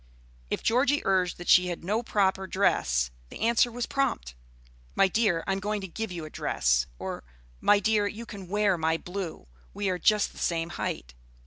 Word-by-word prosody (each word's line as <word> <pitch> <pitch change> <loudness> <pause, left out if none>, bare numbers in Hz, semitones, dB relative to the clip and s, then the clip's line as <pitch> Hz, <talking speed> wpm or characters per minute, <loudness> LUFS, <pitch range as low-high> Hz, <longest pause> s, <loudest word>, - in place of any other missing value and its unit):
If - - -3
Georgie 275 +5 +2
urged 185 -2 +1
that 175 - -9
she 180 0 +6
had 175 -2 -4
no 210 +6 0
proper 195 -4 +1
dress, 60 - +1 0.2
the - - -10
answer 235 +1 +3
was 240 0 -3
prompt, 65 - -1 0.6
"My 195 - +5
dear, 190 -4 +1
I - - -1
am 195 - 0
going 210 +2 -2
to 190 - -5
give 220 +3 -5
you 170 -3 -5
a - - -8
dress;" - - +1
or, - - -5 0.4
"My 205 - +4
dear, 210 0 +2
you 225 +3 -6
can 200 -4 -9
wear 200 -2 +1
my 160 0 +1
blue, 180 -1 -6 0.3
we 205 -1 -1
are 180 -1 -1
just 210 +4 +3
the - - -13
same 165 -1 -1
height." 60 - -4
195 Hz, 195 wpm, -28 LUFS, 170-210 Hz, 0.6 s, she